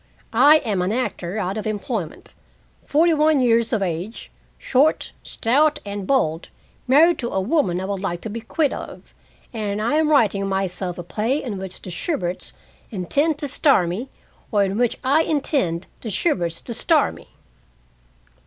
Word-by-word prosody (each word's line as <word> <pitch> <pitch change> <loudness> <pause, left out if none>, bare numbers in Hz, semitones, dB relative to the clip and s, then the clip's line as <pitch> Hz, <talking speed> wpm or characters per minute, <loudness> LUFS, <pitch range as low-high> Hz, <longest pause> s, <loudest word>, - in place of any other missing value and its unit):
I 280 +7 +7
am 200 -5 0
an 180 +2 0
actor 215 -6 -3
out 195 +1 -2
of 215 - -4
employment, 205 - -4 0.5
forty 325 +3 +3
one 305 -1 +3
years 230 -2 +2
of 220 -5 +1
age, 180 +5 -5 0.3
short, 280 +4 +1
stout, 295 +6 +1
and 200 -1 -5
bald, 165 - 0 0.4
married 320 +7 +5
to 235 - -2
a 195 - -1
woman 190 - +1
I 190 - -4
would 200 0 -3
like 175 -3 -3
to 220 - -5
be 230 +2 -5
quit 285 +6 0
of, - - -9 0.4
and 210 -2 -3
I 235 +8 +1
am 310 -1 +2
writing 210 -9 +3
myself 190 -2 -2
a 175 - -5
play 225 - -1
in 210 -7 -4
which 190 -1 -8
the 180 - -7
Shuberts 180 - -3 0.4
intend 280 - +1
to 295 -1 -2
star 275 - +3
me, 200 +10 -4 0.4
or 205 -3 +3
in 195 0 -1
which 245 -2 +1
I 280 +4 +4
intend 275 - 0 0.2
the 225 - -5
Shuberts 175 - -1
to 235 - -6
star - - +2
me." - - -16
220 Hz, 170 wpm, -22 LUFS, 190-280 Hz, 0.5 s, I